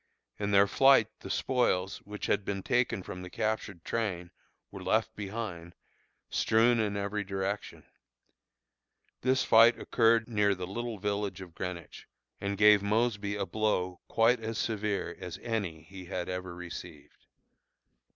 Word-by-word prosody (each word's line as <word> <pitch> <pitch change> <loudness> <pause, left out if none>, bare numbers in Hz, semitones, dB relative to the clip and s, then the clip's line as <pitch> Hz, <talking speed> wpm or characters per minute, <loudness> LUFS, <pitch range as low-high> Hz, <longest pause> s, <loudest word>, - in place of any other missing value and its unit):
In 100 -1 -1
their 100 0 +6
flight 135 +1 +5
the - - -9
spoils, 100 -7 +1
which 105 0 -6
had - - +1
been 100 -1 -3
taken 120 -6 +1
from 90 - -7
the 90 - -8
captured 110 -4 -3
train, 90 -7 -2 0.4
were - - -8
left - - +1
behind, 95 -5 -6 0.5
strewn 115 +2 +3
in 105 -2 0
every 100 +1 -2
direction. 95 +1 -4 1.4
This 130 +1 +2
fight 115 +1 +6
occurred 115 -1 +3
near 105 -3 +2
the 90 -1 -5
little 115 +4 -4
village 100 0 -2
of 90 -3 -10
Greenwich, 90 -2 -7 0.3
and 100 0 -3
gave 105 0 +7
Mosby 105 -1 0
a 105 - -2
blow 95 -5 -1
quite 115 +2 +3
as 115 -1 -4
severe 105 -5 -2
as 90 -3 -6
any 100 -9 -3
he 95 +3 -11
had 90 -1 -4
ever 90 -1 -5
received. 85 -3 -10
100 Hz, 140 wpm, -30 LUFS, 90-110 Hz, 1.4 s, gave